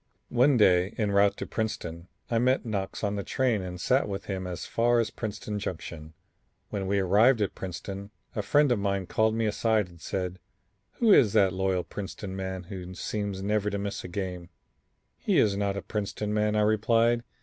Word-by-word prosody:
One 125 +2 +4
day 95 -1 +4
en 105 -3 0
route 100 0 +4
to - - -4
Princeton 85 -6 -4 0.2
I 115 - +3
met 130 +2 +2
Knox 100 -3 -3
on 100 0 0
the 100 - -2
train 125 -4 +1
and 90 -1 -6
sat 130 +3 +2
with 100 -1 -4
him 95 -2 -4
as 90 -1 -5
far 120 +1 +2
as 115 - 0
Princeton 105 -1 -4
Junction. 80 -5 -6 0.6
When 95 -2 -2
we 100 +1 +1
arrived 105 +6 +4
at 105 - 0
Princeton, 95 +2 -6 0.3
a 105 - 0
friend 145 +6 +3
of 120 - +2
mine 100 -1 -1
called 110 +4 +1
me 115 0 0
aside 110 -2 +1
and 85 -2 -17
said: 90 -1 -3 0.5
"Who 225 -4 +4
is 110 - +5
that 100 -4 +4
loyal 95 -1 0
Princeton 95 +3 -6
man 95 -1 -4
who 90 0 -8
seems 100 -1 -3
never 105 0 +1
to 100 - -2
miss 100 0 -4
a - - -6
game?" 90 -1 -5 0.7
"He - - +1
is 100 -2 +4
not 100 0 -1
a - - -4
Princeton 105 0 -3
man," 105 0 +1
I 105 - +3
replied. 115 +2 +3
100 Hz, 195 wpm, -28 LUFS, 95-110 Hz, 0.7 s, is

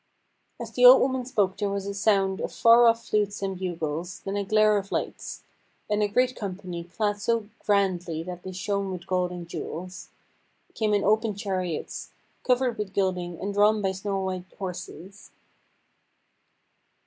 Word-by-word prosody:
As - - -6
the 250 - 0
old 250 +1 +11
woman 260 -1 0
spoke 205 -7 0
there 205 -2 -1
was 200 0 -3
a 200 - -3
sound 195 -2 +2
of - - -3
far 235 0 +6
off 230 0 +2
flutes 205 -1 0
and 190 -2 -3
bugles, 170 -1 -4
then 195 0 -4
a 205 - 0
glare 215 +1 +4
of 200 0 -10
lights; - - -4 0.4
and 210 0 0
a 210 - +3
great 250 +4 +1
company, 185 -4 -5
clad 205 +3 -2
so 230 -1 0
grandly 180 -5 0
that 180 0 -7
they 185 - -7
shone 200 +1 -2
with 180 -1 -6
gold 180 -1 0
and 175 -1 -7
jewels, 180 +2 -7 0.6
came 215 -2 +1
in 200 - +1
open 215 0 +2
chariots, 185 -5 -3 0.3
covered 250 -2 +1
with 200 -2 -4
gilding, 180 -3 -1
and 200 +1 -3
drawn 210 +1 +4
by 195 -2 0
snow 195 +1 -3
white 185 -1 -3
horses. 185 +1 -8
200 Hz, 165 wpm, -26 LUFS, 185-210 Hz, 0.6 s, old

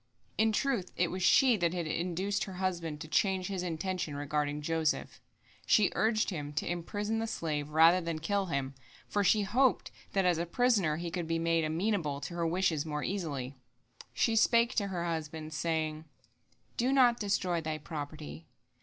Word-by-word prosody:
In 220 0 +3
truth 220 -5 -1
it 175 -1 +1
was 185 - -4
she 250 +5 +5
that 175 -1 0
had 175 -2 -2
induced 180 +5 -1
her 195 - -8
husband 175 -5 -3
to 155 - -6
change 185 +4 +1
his 190 -2 -2
intention 180 -2 -3
regarding 145 0 -2
Joseph; 160 0 -1 0.5
she 210 -3 +4
urged 220 -1 +1
him 150 -4 -5
to 150 - -2
imprison 205 +6 -2
the 225 - -2
slave 150 -8 -3
rather 165 +4 +5
than 165 -1 -3
kill 195 +4 -1
him, 140 -4 -2 0.3
for 205 - 0
she 205 +3 +4
hoped 250 +6 +2 0.2
that 195 -1 +2
as 175 -2 +3
a 170 - -2
prisoner 200 -8 +2
he 170 0 -4
could 175 -2 -3
be 165 0 0
made 165 0 +1
amenable 160 -2 -1
to 170 - -6
her 170 -1 -1
wishes 165 -3 +1
more 150 -2 -4
easily. 145 -9 -3 0.6
She 230 - +1
spake 235 +2 +4
to 200 -3 0
her 175 -3 -3
husband, 160 -1 -4
saying: 155 0 -2 0.7
"Do 250 +3 +2
not 250 -3 +4
destroy 185 -4 0
thy 155 -1 -3
property. 150 +1 -7
170 Hz, 175 wpm, -31 LUFS, 155-200 Hz, 0.7 s, she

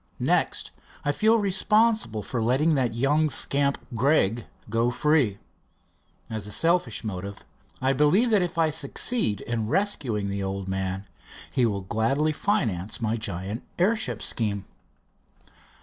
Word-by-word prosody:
Next, - - 0 0.3
I 145 - +3
feel 220 +9 +3
responsible 210 - +2
for 120 - -3
letting 135 +8 +2
that 125 -5 0
young 145 +5 +2
scamp, 140 0 +2 0.2
Gregg, 115 -3 +2 0.2
go 115 +3 +1
free. 130 -5 +2 0.9
At 110 -2 -4
a - - -6
selfish 165 - +1
motive, 100 -1 -6 0.4
I 135 +1 +3
believe 180 - +3
that 210 -3 +4
if 175 -1 -3
I 160 -1 +3
succeed 145 - 0
in 115 -2 -2
rescuing 125 - 0
the 100 0 -3
old 95 0 -3
man 95 0 -3 0.5
he 125 -2 +2
will 100 -3 -2
gladly 115 +11 0
finance 115 - -1
my 110 -1 0
giant 100 0 -4 0.2
airship 215 +5 +1
scheme." 100 -4 -1
120 Hz, 135 wpm, -26 LUFS, 105-160 Hz, 0.9 s, that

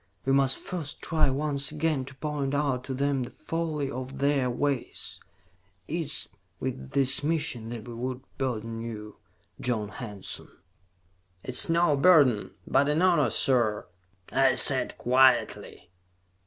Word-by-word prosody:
We 135 - +2
must 135 -1 +3
first 165 -6 -6
try 160 -4 +2
once 140 +1 0
again 155 -3 -1
to 130 0 -12
point 145 -1 -3
out 140 -3 -1
to 135 - -4
them 140 0 0
the 120 - -5
folly 155 -4 -4
of 130 +1 -7
their 140 -2 +1
ways. 135 +1 -3 0.7
It - - -7
is 160 -3 -1 0.3
with 130 +1 -5
this 135 -1 +3
mission 145 -7 -2
that 120 0 -7
we 120 - -7
would 125 +2 -5 0.2
burden 115 -3 -3
you, 105 -2 -8 0.4
John 110 -4 -2
Hanson." 105 -2 -7 0.9
"It - - -8
is 125 - +4
no 165 -2 +3
burden, 140 - +4 0.2
but 140 +1 +2
an 155 +4 +1
honor, 170 -6 +3
sir," 115 -5 +1 0.5
I 135 -1 +3
said 135 -2 +6
quietly. 125 -7 +2
135 Hz, 140 wpm, -27 LUFS, 125-145 Hz, 0.9 s, said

